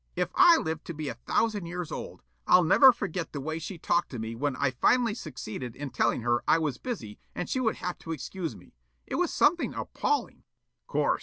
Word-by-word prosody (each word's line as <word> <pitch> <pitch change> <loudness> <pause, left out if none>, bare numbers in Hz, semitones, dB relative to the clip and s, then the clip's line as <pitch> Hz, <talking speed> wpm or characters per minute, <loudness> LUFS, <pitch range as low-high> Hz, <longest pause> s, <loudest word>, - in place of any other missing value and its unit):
"If - - -1
I 340 -1 +7
live 160 - -3
to 170 - -6
be 150 -2 -4
a - - -3
thousand 210 -6 +1
years 175 -1 -5
old, - - -7 0.2
I'll 180 - +6
never 260 - +8
forget 195 -7 -4
the 145 - -3
way 155 +4 -3
she 175 +3 -6
talked 170 +1 0
to 125 - -6
me 110 0 -4
when 140 +3 -1
I 140 0 +1
finally 230 - +3
succeeded 125 - -6
in 145 -2 -6
telling - - +1
her 120 0 +1
I - - +5
was 150 -6 -2
busy 120 - -6 0.2
and 180 - -3
she 260 - -1
would 225 -4 +1
have 180 - -5
to 165 - -7
excuse 165 +3 -4
me. - - -17 0.3
It - - -3
was 360 -2 +1
something 345 +3 +2
appalling." 440 -1 -2 0.4
"Course. - - +1
165 Hz, 215 wpm, -28 LUFS, 140-215 Hz, 0.4 s, never